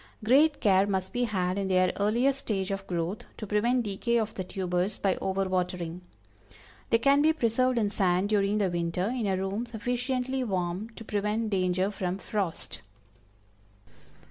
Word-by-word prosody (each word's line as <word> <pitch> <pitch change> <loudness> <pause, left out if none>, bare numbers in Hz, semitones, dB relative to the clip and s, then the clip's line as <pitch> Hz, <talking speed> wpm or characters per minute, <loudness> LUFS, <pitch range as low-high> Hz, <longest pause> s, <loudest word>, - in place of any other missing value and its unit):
Great 285 +7 +4
care 195 -3 +4
must 190 -2 -2
be 245 0 +1
had 185 -3 -1
in 195 - -1
their 185 -1 +3
earliest 240 +7 +2
stage 195 -6 -2
of 195 0 -4
growth, 175 +3 -2
to 215 - -5
prevent 235 +5 +1
decay 220 +3 0
of 220 -1 -1
the 185 - -4
tubers 180 +1 -2
by 195 -2 +1
over 195 0 -1
watering. 180 -2 -2 0.9
They 230 - +5
can 275 +4 +4
be 315 +1 +4
preserved 255 -2 +1
in 210 -3 +1
sand 185 -1 +2
during 205 -1 +2
the 195 -4 +1
winter, 175 +3 -1
in 230 -5 -1
a 190 -1 +1
room 195 +5 -2
sufficiently 250 +3 -2
warm 185 0 -2
to 225 - -9
prevent 210 +1 -1
danger 185 0 +1
from 185 -2 -3
frost. 195 - -4
200 Hz, 165 wpm, -28 LUFS, 185-235 Hz, 0.9 s, They